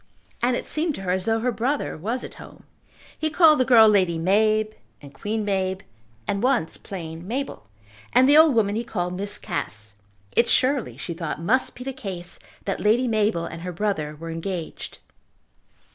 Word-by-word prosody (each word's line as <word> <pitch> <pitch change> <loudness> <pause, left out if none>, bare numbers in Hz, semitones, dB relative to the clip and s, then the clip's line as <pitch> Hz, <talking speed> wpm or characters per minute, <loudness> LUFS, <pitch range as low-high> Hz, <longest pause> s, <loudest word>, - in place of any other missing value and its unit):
And 245 +1 +2
it - - -4
seemed 310 -1 -1
to - - -7
her 180 - -1
as 185 0 0
though 225 0 +1
her 250 +1 +1
brother 255 +6 -1
was 225 +10 -3
at - - -8
home. - - -13 0.5
He 315 - -1
called 310 -2 +6
the 255 - +3
girl 230 -4 +7
Lady 185 -5 +3
Mab, 215 +5 +2 0.3
and 140 -1 -13
Queen 210 +8 -3
Mab, 190 -1 -1 0.4
and 200 - -1
once 245 -9 +1
plain 165 -2 -8
Mabel, 250 - -4 0.4
and 255 - +5
the 290 - +6
old 310 -4 +7
woman 205 -3 +2
he 230 - -1
called 180 -6 -3
Miss 200 +2 -1
Cass. 105 -7 -4 0.4
It 235 - +4
surely, 265 -1 +2
she 170 - -5
thought, 165 -2 -4
must 235 +11 +1
be 250 - -8
the 270 +1 -4
case 190 -9 -7 0.3
that 195 - -2
Lady 230 +5 +3
Mabel 210 -7 +1
and 165 - -7
her 180 +1 -4
brother 170 -5 -2
were 165 +2 -7
engaged. 165 0 -5
205 Hz, 185 wpm, -24 LUFS, 175-245 Hz, 0.5 s, girl